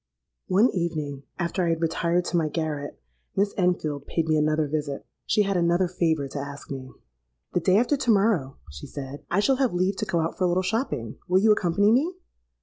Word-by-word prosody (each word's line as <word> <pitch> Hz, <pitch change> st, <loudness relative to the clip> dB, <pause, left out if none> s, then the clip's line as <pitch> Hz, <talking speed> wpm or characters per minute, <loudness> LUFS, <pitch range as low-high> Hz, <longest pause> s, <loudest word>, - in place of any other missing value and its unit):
"One 205 Hz, +6 st, +4 dB
evening, 155 Hz, -6 st, -3 dB
after 175 Hz, +1 st, -1 dB
I 170 Hz, -, +1 dB
had 165 Hz, 0 st, 0 dB
retired 170 Hz, +2 st, +1 dB
to -, -, -2 dB
my 160 Hz, -3 st, +2 dB
garret, 150 Hz, -2 st, -3 dB, 0.4 s
Miss 200 Hz, +1 st, +1 dB
Enfield 160 Hz, -6 st, 0 dB
paid 165 Hz, -1 st, -1 dB
me 155 Hz, -, +3 dB
another 155 Hz, 0 st, +2 dB
visit. 145 Hz, -1 st, -3 dB, 0.2 s
She 210 Hz, -, +3 dB
had 195 Hz, -1 st, -1 dB
another 175 Hz, +1 st, +2 dB
favour 160 Hz, -5 st, 0 dB
to 140 Hz, -, -5 dB
ask 140 Hz, 0 st, -8 dB
me. 130 Hz, -1 st, -6 dB, 0.6 s
'The -, -, +2 dB
day 185 Hz, +3 st, +3 dB
after 245 Hz, +6 st, +3 dB
to 260 Hz, -3 st, -2 dB
morrow,' 195 Hz, -11 st, +2 dB
she 70 Hz, -1 st, -9 dB
said, 140 Hz, 0 st, -7 dB
'I 180 Hz, -, +2 dB
shall 270 Hz, +5 st, +3 dB
have 255 Hz, -8 st, +1 dB
leave 185 Hz, +2 st, +1 dB
to -, -, -1 dB
go 170 Hz, -, 0 dB
out 165 Hz, -, -3 dB
for 185 Hz, -, +3 dB
a -, -, +4 dB
little 180 Hz, +2 st, +1 dB
shopping. 185 Hz, -, -2 dB
Will 185 Hz, +1 st, +3 dB
you 220 Hz, +1 st, +5 dB
accompany 205 Hz, +1 st, +3 dB
me?' 305 Hz, +10 st, +2 dB
170 Hz, 210 wpm, -25 LUFS, 150-195 Hz, 0.6 s, you